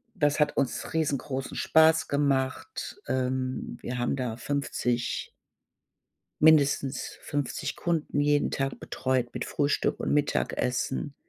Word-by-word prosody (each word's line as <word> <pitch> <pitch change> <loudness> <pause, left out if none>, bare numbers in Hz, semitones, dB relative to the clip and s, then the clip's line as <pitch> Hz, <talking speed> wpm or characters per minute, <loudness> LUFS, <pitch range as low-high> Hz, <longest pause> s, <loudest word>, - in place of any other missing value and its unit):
das 145 0 +2
hat 150 - +2
uns 135 -4 -1
riesengroßen 140 -4 -2
Spaß 160 0 +4
gemacht. 140 - -1
Ähm, 130 0 -1
wir 125 - -4
haben 120 +2 0
da 125 -4 -3
50 125 -3 -2 1.1
mindestens 145 -3 +3
50 145 -3 -3
Kunden 160 -4 -1
jeden 145 0 +2
Tag 135 -1 -2
betreut 130 -2 -1
mit 125 - -3
Frühstück 145 0 0
und - - 0
Mittagessen. 140 -1 0
140 Hz, 110 wpm, -28 LUFS, 130-145 Hz, 1.1 s, Spaß